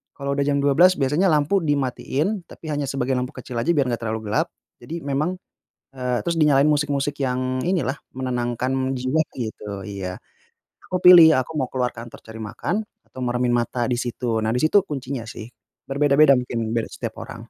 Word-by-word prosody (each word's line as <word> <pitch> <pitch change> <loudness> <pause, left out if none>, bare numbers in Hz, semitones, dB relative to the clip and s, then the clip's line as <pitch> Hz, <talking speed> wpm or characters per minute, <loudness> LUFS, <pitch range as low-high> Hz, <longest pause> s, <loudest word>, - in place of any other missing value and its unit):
kalau 140 0 -3
udah 140 - +1
jam 140 -1 +1
12 175 +7 +5
biasanya 150 +7 +2
lampu 155 +6 +2
dimatiin 145 - -1
tapi 160 - -11
hanya 145 -1 -1
sebagain 135 -1 -1
lampu 125 +3 -4
kecil 125 -1 -8
aja 155 +9 +1
biar 140 -5 +2
nggak 120 - -2
terlalu 110 -1 -3
gelap, - - +1 0.3
jadi 165 +2 -6
memang, 150 +6 -1 0.6
e 125 -2 -1
terus 170 - +1
dinyalain 145 -2 +4
musik-musik 145 -1 0
yang 130 0 -1
inilah 175 -7 0 0.2
menenangkan 130 +1 -1
jiwa 130 +5 +1 0.2
gitu, 105 -4 -5
iya. 95 -2 -5 0.7
Aku 185 - 0
pilih, 170 -3 +9
aku 130 +4 -2
mau 130 - +1
keluar 125 -2 0
kantor 115 0 -10
cari 110 0 -10
makan 120 - -3 0.3
atau - - -11
meremin 120 0 0
mata 120 0 -1
di 125 - 0
situ. 120 -1 -2
Nah 110 - +1
di 125 - 0
situ 195 +5 +4
kuncinya 135 -6 -5
sih. 110 0 -8 0.4
Berbeda-beda 140 +1 +5
mungkin, 115 -2 -3
beda 115 - 0
setiap - - -6
orang. - - -10
130 Hz, 180 wpm, -23 LUFS, 120-150 Hz, 0.7 s, pilih